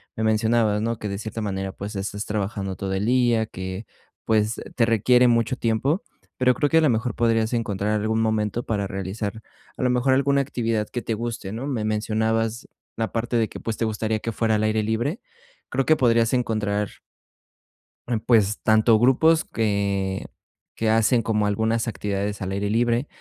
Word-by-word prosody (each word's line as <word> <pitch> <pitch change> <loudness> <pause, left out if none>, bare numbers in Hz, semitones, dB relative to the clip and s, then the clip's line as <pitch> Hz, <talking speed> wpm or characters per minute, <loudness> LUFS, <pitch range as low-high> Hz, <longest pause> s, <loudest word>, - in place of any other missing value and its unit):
Me 110 - -2
mencionabas, 110 -1 +2
¿no?, 115 +1 -1
que 105 - -4
de 100 - -3
cierta 110 +2 -5
manera, 95 -2 -3
pues, 105 +3 -7
es 95 0 -3
estás 105 +1 -5
trabajando 100 -2 -3
todo 95 0 -4
el 95 +2 -1
día 120 -2 +3
que, 95 +2 -6 0.4
pues, 110 0 +1
te 115 - +3
requiere 125 +3 +4
mucho 120 +2 +2
tiempo, 130 - 0 0.3
pero 125 0 +4
creo 145 +2 0
que 160 - +3
a - - +6
lo 155 - +4
mejor 115 +1 0
podrías 115 -1 +1
encontrar 105 -2 0
algún 110 +1 0
momento 110 0 0
para 105 -3 -1
realizar 100 +3 -4 0.4
a - - -5
lo 125 - +3
mejor 125 +2 +2
alguna 140 +1 +3
actividad 115 -5 -1
que 120 - -4
te 115 - -2
guste, 115 -3 -5
¿no? 115 +5 -5
Me 125 -6 -2
mencionabas 110 +1 -1 0.3
la 115 0 -2
parte 120 +1 -2
de 110 -2 +1
que, - - -9
pues, 115 - -3
te 115 - 0
gustaría 110 0 -1
que 115 - -3
fuera 110 -1 +1
al 105 - 0
aire 110 0 +1
libre. 120 - -1 0.5
Creo 135 0 0
que 155 - +6
podrías 115 -4 +3
encontrar 105 -5 0 1.2
Em, 120 -2 0
pues, 110 -2 +2
tanto 110 0 +4
grupos 155 +7 +4
que, 100 -3 -1 0.5
que 110 - 0
hacen 115 +2 +3
como 105 -2 0
algunas 110 +3 0
actividades 100 -1 -3
al 95 0 -3
aire 100 +1 -1
libre, 120 +4 +1
110 Hz, 185 wpm, -24 LUFS, 105-120 Hz, 1.2 s, a